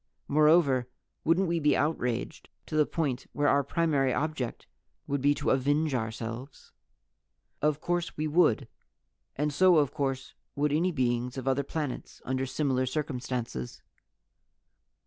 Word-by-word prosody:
Moreover, 145 -4 +4 0.3
wouldn't 175 +4 +3
we 170 0 0
be 150 -1 +3
outraged 125 -6 -2 0.2
to - - -6
the 150 -1 +4
point 140 -7 -2
where 145 0 +1
our 140 0 +4
primary 140 -3 +1
object 150 -5 -2 0.4
would 140 -1 -2
be 145 +1 +3
to - - 0
avenge 145 +3 +1
ourselves? 115 +3 -5 0.9
"Of 150 0 +1
course 175 +1 -2
we 155 - -1
would. 155 -6 +3 0.7
And 150 +1 -1
so 185 +2 +5
of 145 -4 +2
course 135 -2 -2 0.2
would 145 0 +1
any 175 +4 +2
beings 125 -3 -1
on 130 0 -5
other 135 +1 +2
planets, 145 -1 -5
under 130 +1 -1
similar 130 -2 0
circumstances." 125 - -4
140 Hz, 135 wpm, -29 LUFS, 130-155 Hz, 0.9 s, so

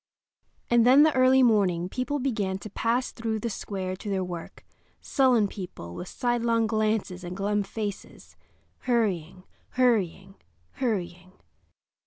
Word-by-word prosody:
And 240 -1 +4
then 260 +5 +7
the 310 -1 +4
early 260 0 +5
morning 190 -7 +2
people 255 +8 -2
began 215 -8 -1
to 205 +1 -10
pass 235 +4 0
through 225 -1 -3
the 230 +2 -3
square 190 -2 -4
to 205 - -7
their 190 -2 0
work—sullen 210 +6 -1
people, 180 - -8
with 180 - -7
sidelong 235 -1 0
glances 215 -4 -1
and 175 +1 -6
glum 205 +1 0
faces, 205 0 -7 0.4
hurrying, 190 -8 -1 0.3
hurrying, 195 -6 0 0.3
hurrying. 185 -7 -3
215 Hz, 125 wpm, -26 LUFS, 185-240 Hz, 0.4 s, then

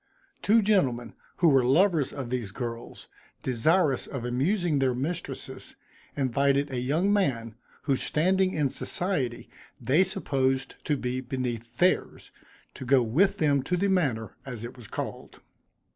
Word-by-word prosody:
Two 220 +2 +4
gentlemen, 130 - +1 0.2
who 170 - +4
were 135 -3 +4
lovers 160 +3 +3
of 130 -4 -6
these 120 -5 -2
girls, 115 +2 -7 0.4
desirous 135 +3 +2
of 130 -4 -5
amusing 150 - +1
their 130 -2 +1
mistresses, 165 +7 -5 0.4
invited 140 +1 +1
a 130 - -2
young 160 +11 +1
man, 120 - 0 0.3
whose 135 -3 0
standing 185 +4 +2
in 145 -3 +1
society 145 -11 -2 0.3
they 150 +8 +3
supposed 135 -8 -1
to 150 -3 +1
be 125 0 -3
beneath 120 -2 -4
theirs, 180 +1 +1 0.4
to - - -8
go 130 0 +4
with 160 - +2
them 145 -3 +2
to 180 +7 -1
the 200 +3 +1
manor, 130 - 0
as 125 -5 -7
it 120 +2 -7
was 120 -4 -12
called. - - -6
135 Hz, 145 wpm, -27 LUFS, 125-175 Hz, 0.4 s, Two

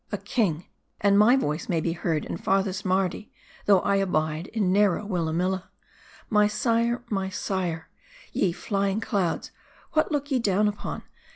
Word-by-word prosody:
A - - -1
king, 180 -9 -1 0.3
and 200 0 +3
my 230 +5 +6
voice 155 - -2
may 170 - +1
be 165 +1 -1
heard 165 -2 -1
in - - -4
farthest 195 0 0
Mardi, 190 +1 -1 0.4
though 195 -3 +6
I 200 - +2
abide 160 -3 0
in 205 -5 0
narrow 205 0 +3
Willamilla. 180 0 -1 0.6
My 210 -2 +4
sire! 230 +3 0
my 195 -2 -1
sire! 180 -4 -3 0.5
Ye 185 - +2
fly 200 +3 -1
ing 195 +2 -1
clouds, 190 -6 -1 0.4
what 310 0 +2
look 290 -1 -2
ye 260 - +3
down 210 -2 +2
upon 205 -1 -4
195 Hz, 160 wpm, -26 LUFS, 175-210 Hz, 0.6 s, my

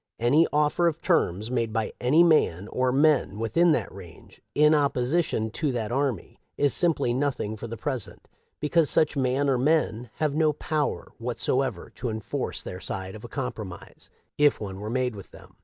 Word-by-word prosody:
Any 140 +8 +4
offer 150 +3 +2
of 165 -1 -1
terms 110 - 0
made 115 -3 0
by 110 0 -2
any 145 +7 +5
man 105 - +3
or 130 0 0
men 140 -6 +2
within 165 +10 +2
that - - -2
range 90 -4 -13
in 150 +1 +5
opposition 140 -4 +1
to 145 +4 -1
that 115 -3 -3
army 130 -6 -2 0.2
is 145 -1 +2
simply 165 -8 +1
nothing 130 -5 -1
for 115 +2 -7
the 115 0 -6
present, 115 0 -5 0.3
because 150 +1 +2
such 155 - +3
man 135 +1 +1
or 130 -3 +2
men 125 -5 +1
have 150 -2 0
no 155 0 +2
power 150 0 -2
whatever 125 -2 -2
to 125 - -5
enforce 110 -1 -4
their 90 - -7
side 95 0 -5
of 110 - -10
a 120 - -8
compro 125 -5 -4
mise, 90 -1 -12 0.3
if 145 -1 +4
one 95 -2 -6
were 105 +1 -5
made 125 -1 -1
with 100 - -10
them. - - -16
130 Hz, 180 wpm, -26 LUFS, 110-150 Hz, 0.3 s, any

